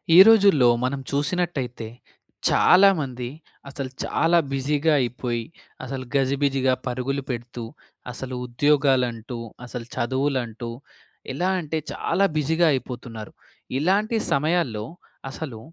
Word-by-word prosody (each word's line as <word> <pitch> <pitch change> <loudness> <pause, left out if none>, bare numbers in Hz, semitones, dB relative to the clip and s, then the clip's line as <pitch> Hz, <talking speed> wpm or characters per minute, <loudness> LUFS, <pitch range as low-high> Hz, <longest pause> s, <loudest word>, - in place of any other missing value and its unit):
ఈ - - +9
రోజుల్లో 200 - +6 0.2
మనం 130 +2 -1
చూసినట్టయితే 140 -6 -2 0.6
చాలామంది 150 -11 +4 0.4
అసలు 135 -1 -5
చాలా 165 +1 +2 0.2
బిజీగా 145 +3 +1
అయిపోయి, 120 -1 -2 0.4
అసలు 130 0 -5
గజిబిజిగా 135 -1 +2
పరుగులు 130 +3 -2
పెడుతూ, 120 -1 -5 0.5
అసలు 130 +1 -6
ఉద్యోగాలంటూ, 125 -3 +1 0.3
అసలు 120 -1 -7
చదువులంటూ, 125 -2 -1 0.6
ఎలా 175 +7 0
అంటే, 160 0 -3 0.2
చాలా 190 +4 +1
బిజీగా 160 +3 +2
అయిపోతున్నారు. 120 -4 -6 0.5
ఇలాంటి 200 +8 +1 0.2
సమయాల్లో 140 -8 0 0.5
అసలు, 135 -6 -7
135 Hz, 95 wpm, -24 LUFS, 125-155 Hz, 0.6 s, ఈ